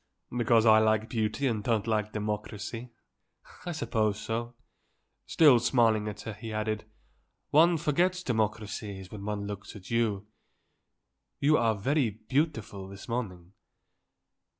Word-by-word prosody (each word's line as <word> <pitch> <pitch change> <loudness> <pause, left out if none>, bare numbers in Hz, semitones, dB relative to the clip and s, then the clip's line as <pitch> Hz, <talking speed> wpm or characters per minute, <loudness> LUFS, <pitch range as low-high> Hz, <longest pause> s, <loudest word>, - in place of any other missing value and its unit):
"Because 120 -2 +3
I 110 -1 +7
like 110 +1 +2
beauty 110 +4 -1
and 110 -5 0
don't 110 -3 +1
like 105 -2 0
democracy. 105 +2 -4 0.8
I - - -1
suppose 110 -8 0
so." 115 +2 -4 0.7
Still 145 -7 +6
smiling 115 -3 +2
at 105 0 -6
her 110 - -6
he 110 +2 -8
added, 110 0 -2 0.7
"One 165 +3 +5
forgets 175 +4 +1
democracies 105 - -3
when 105 -2 -8
one 105 -1 -3
looks 100 +1 -7
at 95 0 -11
you. 110 -4 0 1.1
You 150 +2 +4
are 115 -5 +2
very 130 +5 +1
beautiful 110 -3 -2
this 100 0 -11
morning." 95 -7 -4
110 Hz, 125 wpm, -29 LUFS, 105-120 Hz, 1.1 s, I